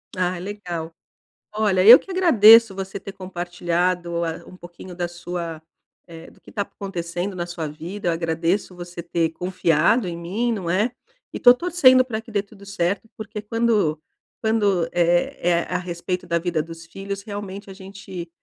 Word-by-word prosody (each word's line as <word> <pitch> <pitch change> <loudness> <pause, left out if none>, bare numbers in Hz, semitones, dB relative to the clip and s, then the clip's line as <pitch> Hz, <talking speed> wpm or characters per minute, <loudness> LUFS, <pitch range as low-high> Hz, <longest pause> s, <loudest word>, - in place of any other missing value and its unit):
Ah 185 -1 -1
legal. 175 -4 -6 0.6
Olha, 205 -4 +2
eu 240 +3 +12
que 385 - -11
agradeço 230 - +7
você 190 0 -5
ter 195 - -8
compartilhado 175 -1 -2
a 165 +1 -4
um 185 - -13
pouquinho 175 0 -11
da 175 -1 -2
sua, 175 -2 -6 0.4
eh, 165 0 -12
do - - -22
que - - -15
tá 205 - -2
acontecendo 180 -1 -5
na 175 -1 -3
sua 170 -3 -4
vida, 170 +5 -5
eu - - +3
agradeço 165 +3 -1
você 175 0 -8
ter 170 -1 0
confiado 180 +4 +1
em 170 - -4
mim, 205 +8 -2
não 185 -5 -4
é? 210 +7 +1 0.4
E - - -4
tô 245 0 +8
torcendo 260 -5 +4
pra 220 -3 -4
que 225 - -14
dê 200 -1 +1
tudo 200 -1 -16
certo, 200 +2 -2
porque 215 0 -6
quando 215 -8 +1 0.4
quando, 205 -6 +1
eh 175 0 +2
eh, 170 0 +2
a 180 - 0
respeito 180 +1 -4
da 170 - +1
vida 170 -2 -1
dos 165 +1 -10
filhos, 195 +3 -6
realmente 200 -1 -7
a - - -8
gente 190 -3 -9
185 Hz, 175 wpm, -22 LUFS, 170-205 Hz, 0.6 s, eu